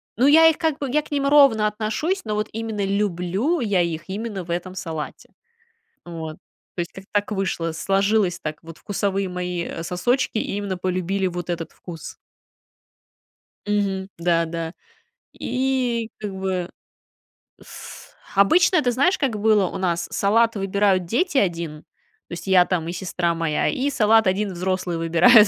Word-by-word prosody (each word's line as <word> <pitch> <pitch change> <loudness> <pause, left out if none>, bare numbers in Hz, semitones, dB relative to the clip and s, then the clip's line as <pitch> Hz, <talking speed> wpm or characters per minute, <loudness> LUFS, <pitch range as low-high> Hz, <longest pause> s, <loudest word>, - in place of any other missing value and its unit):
ну, 250 +5 +3
я 320 +3 +8
их 320 - +3
как 315 -3 0
бы 280 - -3
я 300 +3 +3
к 305 - -18
ним 285 -1 0
ровно 275 -7 +6
отношусь, 220 - -1
но 215 -2 -2
вот 210 +1 -1
именно 220 -2 -3
люблю 200 - 0
я 205 -7 +2
их 170 -1 -2
именно 200 0 -4
в 170 - -7
этом 180 +2 -3
салате. 160 -5 -6 0.8
Вот, 160 -2 -6 0.4
то - - -2
есть 170 - -4
как-то 195 0 -12
так 205 0 0
вышло, 185 -4 -1
сложилось 195 +2 +1
так, 155 0 -5
вот 165 -1 -11
вкусовые 195 -1 -1
мои, 180 -1 -3
э, 165 - -6
сосочки 205 +8 0
именно 200 -2 -2
полюбили 185 +1 -1
вот 175 -1 -4
этот 170 -1 -4
вкус. 170 -3 -9 1.5
Мгм. 200 -2 0
Да, 170 0 +2
да. 165 0 -4 0.7
И 250 -3 -1
как 205 -2 -5
бы 190 -2 -2 0.9
с - - -11 0.2
обычно, 315 - +5
ты 245 - +1
знаешь, 315 +10 +2
как 260 -7 0
было 210 -2 +4
у - - -5
нас? 175 -2 -1
Салат 230 +3 +3
выбирают 195 -1 +1
дети, 280 - 0
1, 170 - 0 0.5
то - - -9
есть 175 +2 -7
я 185 -2 +6
там 170 -3 -1
и 170 - -3
сестра 180 -2 -1
моя, 165 -2 0
и 280 0 0
салат 225 -4 +4
1 195 +1 0
взрослые 180 -1 -2
выбирают, 170 +7 +6
195 Hz, 160 wpm, -23 LUFS, 175-225 Hz, 1.5 s, я